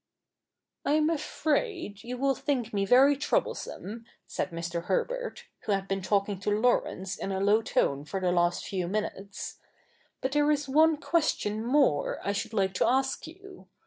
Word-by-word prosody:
' - - -61 0.3
I 285 - +1
am 310 +1 +3
afraid 310 - -1
you 250 +1 -5
will 275 +1 +2
think 250 -4 -2
me 200 -1 +1
very 270 +6 +6
troublesome,' 235 - -2 0.2
said - - -3
Mr. 170 0 -4
Herbert, - - -2 0.2
who 210 - +1
had 195 0 -1
been 195 0 -1
talking 200 0 0
to 200 - -2
Laurence 205 -3 +1
in 195 - -4
a 190 - -1
low 205 +3 +4
tone 140 -9 0
for 195 +5 -3
the 180 -1 +1
last 175 0 +1
few 185 -3 -2
minutes, 200 0 -4 0.3
' - - -37
but 260 - -1
there 295 +1 +3
is 295 -1 +1
one 310 +3 +4
question 285 -10 0
more 250 - +2
I 200 - 0
should 200 +3 -3
like 195 -3 +1
to 185 - +2
ask 265 +4 +1
you. 380 +3 -13
220 Hz, 175 wpm, -28 LUFS, 195-290 Hz, 0.3 s, very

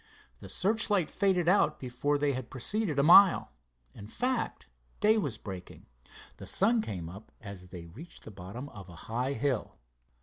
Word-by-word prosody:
The - - -9
searchlight 205 -3 +2
faded 185 -4 +1
out 195 +4 +3
before 130 +3 -1
they 145 -1 +1
had 130 -2 -5
proceeded 165 - -1
a 140 - +4
mile. 180 - +7 0.4
In 100 - -11
fact, 250 - -2 0.3
day 215 +1 +4
was 150 - -1
breaking. 95 -3 -9 0.5
The - - -9
sun 225 +4 +3
came 90 - -5
up 100 +6 -11
as 100 -4 -9
they 90 -2 -9
reached 130 - -12
the - - -10
bottom 100 +8 -8
of 95 -6 -12
a 85 - -11
high 125 +4 -2
hill. 130 -1 -2
135 Hz, 165 wpm, -30 LUFS, -, 0.5 s, mile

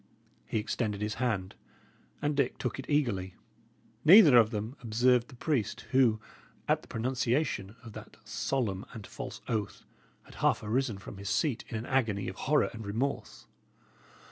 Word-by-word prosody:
He - - -1
extended 105 -1 -2
his 105 +1 -2
hand, 100 -7 -1 0.7
and 145 0 +1
Dick 140 -3 0
took 125 +1 -3
it 135 - -7
eagerly. 110 -11 0 0.7
Neither 165 - +9
of 115 -2 +7
them 110 +3 -4
observed 120 +1 +2
the 135 - -14
priest, 120 -6 -1
who, 125 -5 +4 0.5
at - - +2
the - - -17
pronunciation 120 -3 -1
of 115 -2 -10
that - - -11
solemn 105 -8 -2
and 110 -3 -8
false - - -8
oath, 110 -4 -3 0.4
had - - -16
half - - +2
arisen 115 0 0
from 100 0 -10
his 100 0 -5
seat 140 -8 0
in 115 - -3
an 110 - -5
agony 110 -7 0
of 95 - -5
horror 150 0 +3
and 115 -1 -7
remorse. 115 +7 -3
115 Hz, 160 wpm, -30 LUFS, 105-130 Hz, 0.7 s, Neither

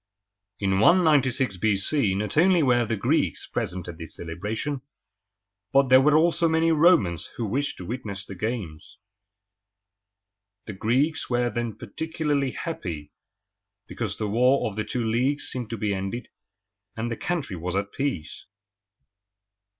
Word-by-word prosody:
In 95 -1 +1
196 135 - +4
B.C. 100 - +1
not 105 +2 -2
only 175 +1 +5
were 120 -3 +3
the 115 - 0
Greeks 100 - 0
present 90 -1 -3
at 85 -2 -8
this 80 - -8
celebration, 105 - -4 0.9
but 135 -1 +4
there 130 +1 +8
were 150 +2 +5
also 170 +1 +3
many 160 +1 +3
Romans 155 - +3
who 115 - -2
wished 140 +7 -2
to 90 - -8
witness 105 -3 -5
the 100 - -8
games. 95 -6 -5 1.7
The 105 - -6
Greeks 130 +11 0
were 120 -1 +1
then 120 -2 -3
particularly 145 +3 -2
happy 85 - -5 0.8
because 105 -4 -4
the 105 - -2
War 125 +6 +3
of 105 - -6
the 105 - -1
Two 120 +1 -2
Leagues 125 +6 +1
seemed 125 -3 -3
to 115 - -4
be 105 -1 -1
ended, 95 +5 -4 0.7
and 115 +1 -2
the - - -1
country 170 - -3
was 90 +2 -4
at 100 +1 -1
peace. 130 - -4
120 Hz, 140 wpm, -25 LUFS, 100-145 Hz, 1.7 s, there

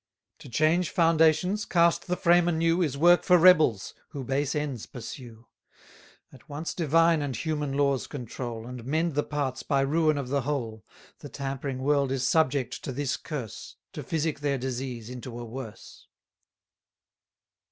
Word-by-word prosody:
To - - -12
change 155 +7 +2
foundations, 165 +4 +3
cast 170 -4 +2
the 180 0 -1
frame 175 -1 +4
anew, 165 +1 +1
Is 145 -5 -1
work 175 +4 +5
for 180 - +5
rebels, 155 - +4 0.2
who 140 -3 -6
base 135 +3 -1
ends 145 -6 -3
pursue; 115 -1 -10 0.9
At 130 - -17
once 150 +3 -4
divine 165 0 +3
and 140 -3 -3
human 150 -3 -2
laws 140 -2 +1
control, 120 -3 -6
And 125 -1 -8
mend 160 +5 0
the 145 - +1
parts 140 -4 -3
by 140 -2 +1
ruin 155 +2 +2
of 135 -3 -4
the 140 +1 0
whole, 120 -6 -4 0.4
The 145 - -9
tampering 135 -1 -4
world 140 -1 +2
is 130 -1 0
subject 140 -5 +1
to - - -4
this 140 +1 -2
curse, 135 - -7 0.2
To - - -6
physic 160 -2 -2
their 145 -1 0
disease 125 -3 -5
into 125 -1 -8
a 120 - -6
worse. 115 -2 -10
140 Hz, 155 wpm, -27 LUFS, 130-160 Hz, 0.9 s, work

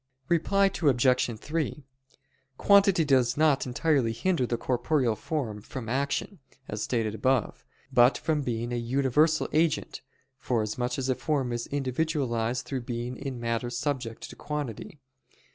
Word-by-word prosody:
Reply 195 +4 +3 0.2
Obj. 125 -5 +2
3: 150 -1 -3 0.7
Quantity 195 -4 +5
does 130 -3 +3
not 150 -4 +3
entirely 125 -2 +1
hinder 130 +2 0
the 120 - -1
corporeal 125 -1 0
form 110 -3 -4
from 120 +2 -7
action, 140 - -2 0.3
as 105 0 -4
stated 115 -3 -1
above; 125 +2 0 0.3
but 125 +1 +5
from 155 -2 0
being 120 -2 -3
a - - -1
universal 135 +6 +2
agent, 160 -1 0 0.4
forasmuch 120 +1 -1
as 135 -1 -2
a 130 - +3
form 130 0 -1
is 120 0 -3
individualized 130 -4 -1
through 135 -2 -3
being 120 +1 -4
in 135 -3 -6
matter 115 +1 -2
subject 120 -2 -3
to - - -11
quantity. 150 - -5
130 Hz, 135 wpm, -27 LUFS, 120-150 Hz, 0.7 s, Quantity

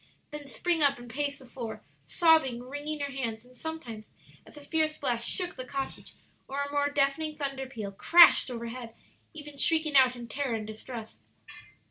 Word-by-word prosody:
then 295 -1 -7
spring 335 +4 0
up 280 -1 +4
and 240 -1 -11
pace 285 +2 -1
the 265 - -13
floor, 235 -3 -7 0.2
sobbing, 315 -8 +3
wringing 290 +4 -5
her 280 0 -2
hands, 230 -4 -4
and 250 0 -19
sometimes, 245 -8 -7 0.4
as - - -14
a - - -10
fierce 310 +1 0
blast 235 -4 -1
shook 360 -1 -1
the 255 - -5
cottage 270 +1 -6 0.3
or 280 +1 -2
a 285 - -5
more 285 0 +1
deafening 290 +2 0
thunder 275 -2 -3
peal 220 -6 -6
crashed 335 - +7
over 235 -2 -5
head, 235 -1 -8 0.4
even 295 -2 -10
shrieking 315 +1 +2
out 260 -2 +6
in 240 -1 -8
terror 265 0 -2
and 215 -1 -4
distress. 220 +1 -8
275 Hz, 180 wpm, -29 LUFS, 240-295 Hz, 0.4 s, crashed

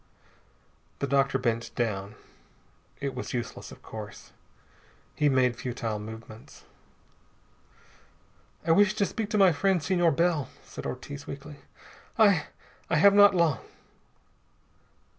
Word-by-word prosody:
The - - -2
doctor 135 0 +2
bent 115 -2 -2
down. 105 -3 -2 0.8
It 140 -1 -3
was 125 0 -5
useless, 120 - -5
of - - -14
course. - - -9 0.8
He 150 -1 +2
made 130 -2 +2
futile 115 -3 -4
movements. 110 +1 -11 2.0
"I 165 - +2
wish 205 +4 +4
to 205 -2 +2
speak 215 +1 -4
to 215 - 0
my 195 -3 +6
friend, 185 +1 +1
Senor 175 +1 +3
Bell," 165 -2 +1
said - - -8
Ortiz 140 +3 -7
weakly. 140 +1 -8 0.6
"I 200 -9 +4 0.4
I 170 - +2
have 195 +6 +6
not 205 -1 +7
long." 165 -9 +2
140 Hz, 120 wpm, -28 LUFS, 120-180 Hz, 2.0 s, not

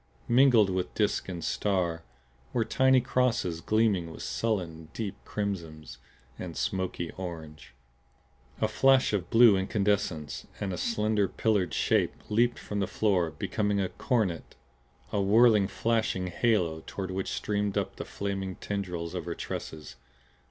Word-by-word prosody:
Mingled 120 -5 +5
with 90 -1 -2
disk 105 -2 0
and 85 -3 -5
star 90 -5 0 0.5
were 115 -3 +1
tiny 130 +2 +4
crosses 120 -9 0
gleaming 105 -6 +1
with - - -8
sullen, 85 -8 -2
deep 105 -4 -3
crimsons 85 -7 -5 0.4
and 85 -3 -6
smoky 95 -3 -2
orange. 80 -7 -8 0.9
A 110 - +3
flash 130 +2 +4
of 95 -4 -1
blue 115 -3 +7
incandescence 95 -6 -1
and 95 -2 -2
a - - -2
slender 105 -3 +1
pillared 105 -4 0
shape - - +2
leaped 120 +3 +2
from 105 - -4
the 100 - 0
floor; 95 -6 +1
became 105 +5 -1
a 95 -2 0
coronet, 105 - -1 0.6
a 100 - +1
whirling, 105 0 +5
flashing 110 -3 0
halo 90 -5 +1
toward 95 -1 -5
which 95 0 -3
streamed 105 -1 -1
up 95 -1 -2
the - - -4
flaming 95 -2 -4
tendrilings 90 -5 -4
of - - -4
her - - -4
tresses. 75 -1 -6
100 Hz, 140 wpm, -29 LUFS, 90-110 Hz, 0.9 s, blue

